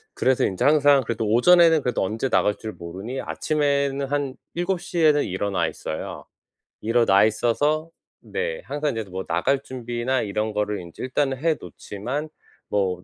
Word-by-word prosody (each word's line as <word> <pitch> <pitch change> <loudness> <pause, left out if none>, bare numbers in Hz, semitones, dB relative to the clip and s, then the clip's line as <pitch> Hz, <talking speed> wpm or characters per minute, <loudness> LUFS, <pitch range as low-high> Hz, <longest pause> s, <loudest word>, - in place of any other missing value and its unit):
그래서 130 -1 +2
인제 95 - -1
항상 145 -2 +5
그래도 115 -1 -2
오전에는 165 +7 +6
그래도 125 -5 0
언제 110 +7 -2
나갈 105 - +2
줄 110 -1 -6
모르니 95 +10 -6
아침에는 140 -2 0
한 140 -1 -2 0.2
7:00 175 0 -2
에는 150 -2 +5
일어나 95 -2 -1
있어요. 80 - -6 0.6
일어나 115 -3 +4
있어서 145 +9 +1 0.3
네. 485 +2 -3
항상 150 0 -1
인제 110 - -1
뭐 95 +1 -4
나갈 135 +12 +1
준비나 125 0 -2
이런 105 +1 -2
거를 105 -2 -1
인제 85 +5 -9
일단은 135 +1 0
해 160 +2 +1
놓지만 130 +10 -5 0.4
뭐 95 -3 0
130 Hz, 320 characters per minute, -24 LUFS, 105-145 Hz, 0.6 s, 오전에는